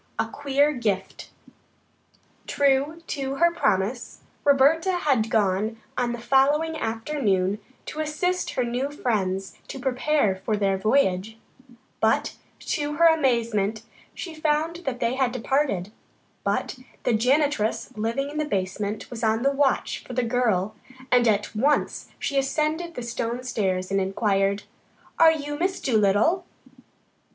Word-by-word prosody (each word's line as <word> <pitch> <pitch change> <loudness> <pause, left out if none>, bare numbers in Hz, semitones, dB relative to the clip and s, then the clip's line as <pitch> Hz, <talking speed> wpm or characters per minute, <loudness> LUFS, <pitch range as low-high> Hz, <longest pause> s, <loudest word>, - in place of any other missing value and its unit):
A - - +1
QUEER 285 +1 +1
GIFT 205 -7 -3 1.2
True 285 +4 +1
to 275 -3 -3
her 340 +3 +3
promise 215 - -1 0.2
Roberta 290 +6 +4
had 275 -10 +1
gone 215 +1 +1 0.2
on 245 -1 0
the 240 - -3
following 285 +6 +2
afternoon 225 -7 -1 0.3
to 310 - -7
assist 310 +4 -1
her 250 - +1
new 245 +3 -2
friends 195 -9 -2
to - - -7
prepare 260 -5 +1
for 210 +3 -2
their 195 -1 +1
voyage, 215 -1 +1 0.6
but - - +1 0.3
to 295 0 -2
her 335 +3 +4
amazement 235 -9 +2 0.3
she 340 - -6
found 310 +1 0
that 250 -2 -2
they 235 0 +1
had 260 -2 +1
departed, 250 -6 0 0.5
but 255 - -1 0.2
the 245 - +2
janitress 255 0 +1
living 230 +6 -2
in 305 - -4
the 305 - 0
basement 200 -2 -3
was 235 -1 -6
on 220 +1 +2
the 275 - +3
watch 280 -1 0
for 255 - -9
the 250 0 0
girl 225 -5 +1 0.4
and 245 -1 +5
at 210 -1 +1
once 285 +7 +1
she 275 - 0
ascended 310 +5 -1
the 245 - -5
stone 235 +1 -3
stairs 190 -6 -1
and 195 0 +2
inquired: 195 0 +1 0.6
"Are 325 -1 +8
you 290 -1 -4
Miss 375 +2 0
Dolittle?" 220 - +2
250 Hz, 135 wpm, -25 LUFS, 210-290 Hz, 1.2 s, Are